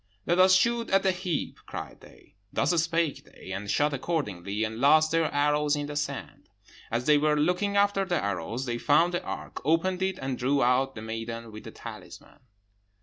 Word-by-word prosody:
'Let 175 +2 +1
us 185 0 +7
shoot 235 +4 +2
at 195 0 +3
that 190 -2 +1
heap!' 180 -5 -3
cried - - -7
they. - - -18 0.2
Thus - - +1
spake 165 -2 -1
they, - - -12
and 100 +2 -5
shot 150 +5 +2
accordingly, 105 - -2
and 110 +1 -3
lost 155 +4 +5
their 165 -1 +1
arrows 150 +1 +2
in 145 0 -3
the 145 0 -6
sand. 145 - -5 0.4
As 120 +2 -2
they 150 -1 +5
were 150 0 +2
looking 180 +6 +1
after 200 -1 +3
the 185 -2 -1
arrows, 100 +6 -3
they 120 -2 -3
found 165 +6 +3
the 175 - -1
ark, - - -6
opened 165 +5 +1
it, 190 -1 0
and 135 -5 -4
drew 135 +2 +2
out 130 +2 +2
the 110 - -7
maiden 115 +1 -6
with 105 0 -10
the - - -8
talisman. - - -11
150 Hz, 195 wpm, -27 LUFS, 120-175 Hz, 0.4 s, us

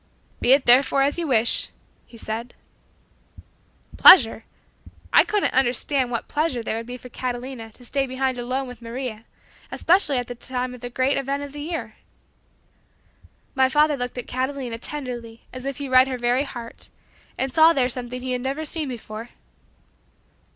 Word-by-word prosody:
"Be 245 - +2
it 275 0 +3
therefore 270 +2 +5
as 285 +5 0
you 335 - -2
wish," 235 -3 +2 0.4
he 235 - -15
said. 230 +2 -6 1.4
Pleasure? 230 -10 +7 0.7
I - - +7
couldn't 415 -1 0
understand 260 +1 +2
what 235 -2 -3
pleasure 290 -6 -1
there 220 - -3
would 230 0 -6
be 250 0 -6
for 250 - -12
Catalina 245 -2 -5
to 245 - -15
stay 270 +2 -1
behind 260 0 -2
alone 255 +2 -2
with 250 -2 -11
Maria, 235 -1 -6 0.5
especially 330 -6 +2
at 245 - -1
this 245 0 -8
time 255 -1 -3
of 250 - -12
the 245 - -6
great 260 +3 0
event 275 +1 -2
of 285 - -8
the 290 +1 -8
year. 330 +2 -5 1.6
My 265 -1 +3
father 300 +2 +3
looked 245 -1 -5
at 245 - -4
Catalina 255 -2 -3
tenderly 240 -5 -6
as 255 +1 -8
if 275 -1 -4
he 285 - -5
read 255 0 +5
her 260 -1 -3
very 245 +3 +1
heart, 235 -4 -9 0.5
and 265 -1 -2
saw 320 0 +7
there 265 -6 +1
something 250 0 -5
he 260 - -3
had 250 -1 -1
never 275 +5 -3
seen 310 -1 +1
before. 225 -1 -8
255 Hz, 170 wpm, -23 LUFS, 240-275 Hz, 1.6 s, Pleasure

